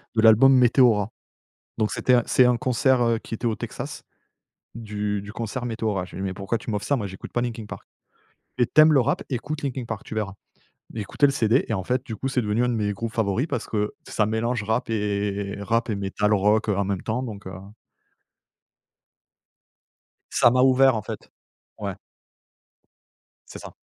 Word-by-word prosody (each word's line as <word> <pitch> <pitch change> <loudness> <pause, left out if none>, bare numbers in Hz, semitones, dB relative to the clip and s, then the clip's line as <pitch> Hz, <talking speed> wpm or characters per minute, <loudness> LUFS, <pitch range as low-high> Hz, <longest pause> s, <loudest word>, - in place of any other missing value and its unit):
de 110 - +3
l'album 115 +5 +7
Meteora. 120 -4 +4 0.7
Donc 110 -1 +1
c'était 130 - +1
un 120 - +3
c'est 130 - +5
un 125 -1 +3
concert, 130 +1 +2
heu, 115 -1 +2
qui 115 - -10
était 115 +2 -2
au 110 - 0
Texas - - -7 0.7
du 105 -2 -3
du 100 +1 -9
concert 120 +3 -4
Meteora. 110 -5 -2
J'ai - - -11
dit 95 - -4
«Mais 95 -1 -2
pourquoi 100 +3 -2
tu 115 - -9
m'offres 105 0 -2
ça? 140 - +2
Moi, 105 -5 -3
j'écoute 95 0 -10
pas 120 - 0
Linkin 115 -3 -4
Park», - - -10 0.7
«Et 120 - +5
tu 155 - +4
aimes 155 0 +7
le 145 - +5
rap, 135 +4 0
écoute 150 +5 -4
Linkin 130 -3 -3
Park, 110 -3 -5
tu 110 - -7
verras». 105 -3 -2 0.6
J'ai 110 - -4
écouté 105 +8 +1
le 140 - +3
CD 115 +1 +2
et - - -2
en 95 -3 -2
fait, 125 +5 -1
du 110 - -5
coup, 135 - -3
c'est 130 - 0
devenu 110 +2 0
un 125 - +1
de - - 0
mes 105 -2 -1
groupes 115 +3 -4
favoris, 110 +3 0
parce - - -4
que, 105 -1 -1 0.2
ça 105 - +1
mélange 110 +1 -1
rap, 110 +3 -1
et 100 -2 -2
rap 115 +3 0
et 105 - 0
metal 100 +2 0
rock, 105 +2 +2
heu, 100 - +1
en 100 - +1
même 95 -2 -2
temps, 115 +3 -2
donc, 105 -6 -7
heu - - -7 2.8
ça 120 - +5
m'a 125 +1 +3
ouvert 130 0 +5
en 110 - -2
fait, - - -8 0.5
ouais. - - -4 1.5
C'est - - -10
ça. - - -10
110 Hz, 200 wpm, -24 LUFS, 105-125 Hz, 2.8 s, l'album